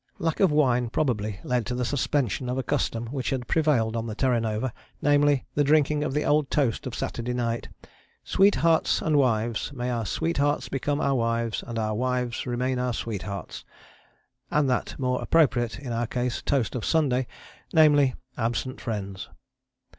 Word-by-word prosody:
Lack 165 -2 -1
of 190 -5 +4
wine 125 -5 +2
probably 110 -7 -1
led 125 -2 0
to 125 - -2
the 125 0 -1
suspension 130 -3 0
of 125 - -1
a 130 - -1
custom 115 0 -1
which 130 -3 -2
had 125 -3 -2
prevailed 135 -9 +2
on 115 0 -2
the 110 - -5
Terra 125 -1 +2
Nova, 110 +2 -2 0.3
namely, 145 -1 +3
the 145 - +2
drinking 150 0 +3
of 135 - -2
the 150 - +1
old 150 -1 +2
toast 135 -4 0
of 125 - -5
Saturday 120 +1 -3
night, 115 -1 -2 0.5
"Sweethearts 170 -5 +3
and 155 -2 +1
wives; 120 -3 +1
may 125 -2 -3
our 115 -3 -2
sweethearts 145 - 0
become 145 +2 -1
our 140 - +1
wives, 115 -2 -1
and 115 -1 -5
our 110 -1 0
wives 125 +1 -1
remain 125 +1 -1
our 125 -1 0
sweethearts," 100 -5 -5 0.9
and 150 -2 +2
that 125 - -1
more 125 -1 -1
appropriate 120 -8 +2
(in 130 -4 -5
our 115 0 -1
case) 125 0 -2
toast 130 -7 0
of 125 - -3
Sunday, 130 -6 +1 0.4
namely, 145 -5 +5 0.2
"absent 120 +3 -2
friends." 100 -5 -5
125 Hz, 170 wpm, -26 LUFS, 115-145 Hz, 0.9 s, namely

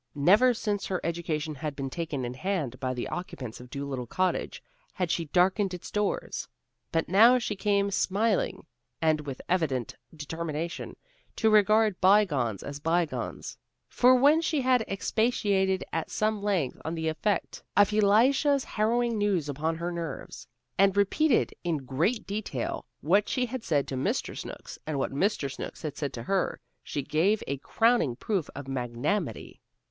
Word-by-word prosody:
Never 205 - +5
since 210 -2 -2
her 185 -2 -1
education 165 -2 -2
had 150 0 -5
been 135 -1 -4
taken 155 -6 -3
in 120 - -4
hand 145 -5 -2
by 130 0 -2
the 120 - -3
occupants 135 -10 -6
of 125 0 -12
Dolittle 135 -2 -4
Cottage, 185 +8 -1 0.3
had 180 -4 -1
she 165 - 0
darkened 185 +4 +2
its 175 - -9
doors. 210 -1 -2 0.4
But 165 0 0
now 225 +7 +7
she 230 -4 -2
came 200 0 +1
smiling, 225 - 0 0.3
and 155 -2 +2
with 140 -3 -6
an - - -22
evident 155 -9 0 0.2
determination 160 +2 -4 0.4
to 220 -1 +2
regard 215 -1 +4
bygones 160 - +3
as 140 0 -6
bygones. 165 +1 -2 0.3
For 255 +1 +5
when 290 +5 +5
she 315 -2 0
had 255 -2 +3
expatiated 195 -2 +1
at 165 - -2
some 215 -1 0
length 190 -10 -1
on 160 - -3
the 160 -1 -2
effect 190 +6 -1 0.2
of 205 0 +5
Elisha's 255 +7 +4
harrowing 230 +1 0
news 195 -7 +1
upon 155 +3 -1
her 170 +2 -3
nerves, 165 -5 -6 0.3
and 195 0 +5
had - - -8
repeated 240 +7 +3
in 160 -6 -2
great 170 - 0
detail 200 - -4
what 195 +8 +3
she 255 -2 +1
had 250 0 -5
said 145 -7 +1
to 135 - -3
Mr. 130 - -1
Snooks, - - -8
and 155 -2 -2
what 135 - -1
Mr. 140 -2 0
Snooks - - -7
had 155 -3 -4
said 145 -3 -3
to 115 - -6
her, 195 +8 0 0.2
she 145 - -4
gave 185 +10 +1
a 140 - -2
crowning 225 - +2
proof 190 - -2
of 140 0 -7
magnanimity. 130 - -3
180 Hz, 165 wpm, -28 LUFS, 145-210 Hz, 0.4 s, now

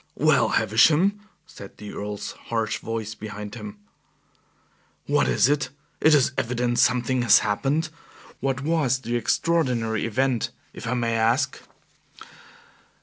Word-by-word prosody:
"Well, - - +3
Havisham," 165 - +3 0.3
said 100 - -13
the 105 -1 -9
Earl's 105 0 -5 0.2
harsh 115 -1 -1
voice 110 -1 -4
behind 105 -1 -8
him. 105 -3 -8 1.3
"What - - +2
is - - +3
it? 145 -2 0 0.3
It 155 -1 +6
is 135 -2 +3
evident 120 0 -1
something 125 +1 +2
has 120 - +6
happened. 140 +10 0 0.5
What 135 -1 -1
was 145 -5 +1
the 120 -2 -3
extraordinary 120 -4 0
event, 130 +1 0 0.2
if - - -8
I 125 - 0
may 115 -2 0
ask?" 115 +4 +1
120 Hz, 125 wpm, -24 LUFS, 110-135 Hz, 1.3 s, It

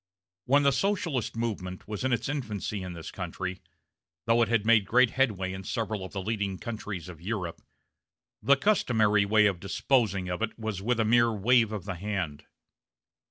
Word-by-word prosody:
When 140 +3 +4
the 140 - +5
Socialist 165 - -1
movement 100 -6 -4
was 105 +1 -4
in 130 - +1
its 120 - 0
infancy 110 -8 -3
in 90 -1 -6
this 85 -2 -8
country 90 0 -5 0.6
though 115 +1 +3
it 115 - +3
had 115 -3 +1
made 115 -2 +5
great 125 +2 +4
headway 100 -8 0
in 95 0 -7
several 110 -1 -3
of 95 - -7
the 95 -2 -4
leading 100 -2 -2
countries 105 -6 -6
of 85 -3 -10
Europe 90 -3 -4 0.8
the 140 0 +4
customary 110 - +3
way 105 +1 +4
of 95 -4 +1
disposing 100 -1 +1
of 90 0 -3
it - - -2
was 110 -4 -4
with 120 +3 0
a 110 - +3
mere 120 +1 +4
wave 115 +1 +3
of 105 -4 -5
the 95 - -3
hand. 90 -5 -4
105 Hz, 180 wpm, -28 LUFS, 95-120 Hz, 0.8 s, the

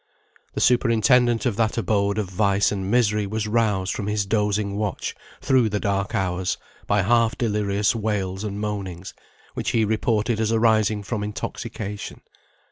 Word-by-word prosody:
The - - -1
superintendent 120 0 +3
of 115 -5 0
that 115 0 +1
abode 100 -2 +1
of 105 -3 -1
vice 100 +1 +2
and 95 -2 -3
misery 105 -3 +2
was 110 +1 -2
roused 105 -4 +1
from 100 - -4
his 105 -1 0
dozing 105 -1 0
watch 105 -3 -2 0.3
through 130 -4 +3
the 105 0 -1
dark 100 -1 -1
hours, 90 -1 -1 0.3
by 100 -1 +2
half 115 +2 +2
delirious 105 -3 +1
wails 100 -3 -2
and 100 -1 -4
moanings, 95 -4 -5 0.4
which - - -2
he 115 -2 +2
reported 110 +1 0
as 110 0 +1
arising 110 -2 +2
from 105 +1 -3
intoxication. 105 0 -6
105 Hz, 150 wpm, -23 LUFS, 100-110 Hz, 0.4 s, superintendent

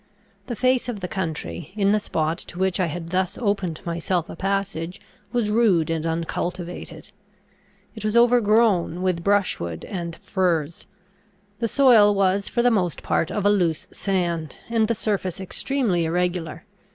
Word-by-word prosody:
The 240 - -3
face 255 +2 +2
of 225 -4 -4
the 180 - -4
country, 160 - -4
in 200 -1 +2
the 210 - +3
spot 160 -4 -1
to 175 - -8
which 190 0 0
I 180 - +2
had 165 +1 -6
thus 185 0 0
opened 195 -7 -1
myself 170 0 -1
a - - -7
passage, 195 -2 -2 0.3
was 235 -4 0
rude 195 -8 +3
and 165 0 -1
uncultivated. 170 +1 -4 0.8
It 220 - -9
was 215 +2 +1
overgrown 215 -7 +3
with 180 -2 0
brushwood 175 - 0
and 170 -3 -5
furze; 170 -4 -1 0.7
the 230 - 0
soil 225 -6 +6
was 195 0 +2
for 235 - 0
the 245 - +4
most 180 -6 0
part 165 - 0
of 205 -2 -2
a 205 - +6
loose 175 -6 +1
sand; 170 -6 -2
and 225 -2 +2
the 230 - 0
surface 200 -4 -2
extremely 195 -2 0
irregular. 175 -1 -2
185 Hz, 155 wpm, -23 LUFS, 170-210 Hz, 0.8 s, soil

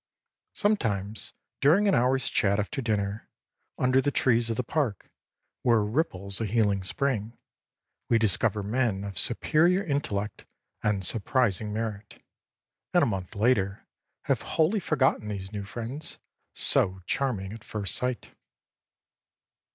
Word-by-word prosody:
Sometimes 110 - -1 0.3
during 175 +9 +4
an 195 - +4
hourâs 130 0 +2
chat 100 0 +2
after 135 +7 -2
dinner, 105 -2 -2 0.5
under 130 +1 +3
the 145 - +1
trees 120 -4 +2
of 115 - -2
the 125 - 0
park, 120 - -2 0.5
where 115 -3 +3
ripples 105 - -1
a 110 - 0
healing 100 -3 +1
spring, 115 +1 -2 0.7
we 115 - +5
discover 105 -1 +1
men 105 -2 0
of 100 -2 -4
superior 170 - +2
intellect 105 - -3 0.3
and 100 -3 0
surprising 110 -1 +1
merit, 105 -1 -5 0.8
and - - +6
a - - +4
month 95 -1 -4
later 100 -2 +1 0.4
have - - 0
wholly 165 +7 +1
forgotten 135 - +1
these 100 -2 -5
new 100 -2 -5
friends, 120 +8 -5 0.4
so 95 0 +3
charming 105 -8 -1
at 110 - -10
first 100 -4 -1
sight. 125 -1 -1
110 Hz, 130 wpm, -27 LUFS, 100-130 Hz, 0.8 s, and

